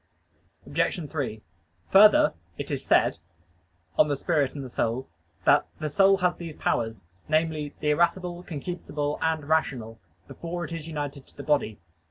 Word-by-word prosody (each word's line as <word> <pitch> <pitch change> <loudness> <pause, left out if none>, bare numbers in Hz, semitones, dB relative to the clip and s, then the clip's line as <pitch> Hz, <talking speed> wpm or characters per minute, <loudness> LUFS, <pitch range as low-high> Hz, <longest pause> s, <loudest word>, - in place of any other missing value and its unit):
Obj. 165 0 -1
3: 130 -8 -3 0.5
Further, 210 +2 +7 0.2
it - - -5
is - - -2
said - - +3 0.8
(De 150 -1 +4
Spiritu 140 -2 0
et 125 - -10
Anima) 115 +3 +1 0.4
that - - +5
"the 155 - -3
soul 195 +6 +5
has 180 -2 +1
these 165 -3 -7
powers" 110 -6 -1 0.2
namely, 155 -2 0
the 150 - +2
irascible, 175 +2 +1
concupiscible, 150 -2 -4
and 160 -2 0
rational 125 -8 0 0.3
"before 175 +1 -5
it - - -10
is 165 -2 -5
united 145 -3 -5
to - - -21
the 140 - -6
body." 140 -8 +1
150 Hz, 145 wpm, -26 LUFS, 140-170 Hz, 0.8 s, Further